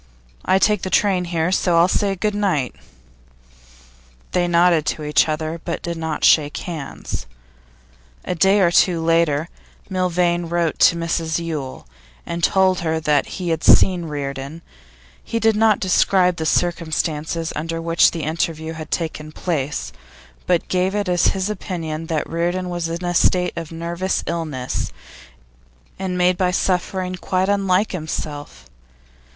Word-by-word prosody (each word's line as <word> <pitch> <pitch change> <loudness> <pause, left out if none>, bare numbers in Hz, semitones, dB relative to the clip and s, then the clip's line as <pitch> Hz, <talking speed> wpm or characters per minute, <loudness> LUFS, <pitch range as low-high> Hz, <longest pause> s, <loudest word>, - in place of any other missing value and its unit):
I 190 - +3
take 210 0 +2
the 185 - -3
train 185 -2 +2
here, 170 0 -1
so 180 -2 +2
I'll 170 +1 +6
say 195 +1 0
good 210 +3 -1
night.' 185 - 0 1.6
They 175 -1 +1
nodded 170 -2 +4
to 155 - -2
each 150 +1 +2
other, 155 +1 -3
but 170 - -4
did 170 0 -3
not 160 -2 -2
shake 145 -2 +4
hands. 155 - -6 1.0
A - - -1
day 195 +4 +3
or 175 -2 +4
two 175 -1 +3
later, 165 -2 +2 0.4
Milvain 175 -2 +1
wrote 170 -1 0
to 170 - +6
Mrs 165 -1 -1
Yule, 155 -6 -5 0.4
and 170 0 -5
told 190 0 +3
her 160 -1 -1
that 150 -2 +1
he 180 -3 -3
had 165 -1 -1
seen 180 -3 +5
Reardon; 140 +1 -5 0.6
he 230 - -2
did 225 -1 +3
not 215 -1 +3
describe 185 -1 +3
the 160 - -2
circumstances 165 -1 -1
under 165 +2 -3
which 165 0 +4
the 165 -2 -5
interview 160 0 -2
had 155 -1 -8
taken 155 -2 -3
place, 150 - -3 0.5
but 175 -2 +1
gave 185 +2 0
it 205 -1 -1
as 175 -1 +3
his 190 0 -1
opinion 165 -6 -4
that 160 -2 -1
Reardon 175 +2 -2
was 175 -1 -2
in 170 +2 -4
a 175 - -1
state 180 +1 +2
of 165 -2 -6
nervous 170 +3 -2
illness, 150 - -3 1.1
and 185 -1 -2
made 180 0 +2
by 185 -1 +2
suffering 185 0 -1
quite 185 +1 -1
unlike 200 0 +2
himself. 155 - -6
170 Hz, 150 wpm, -21 LUFS, 160-185 Hz, 1.6 s, I'll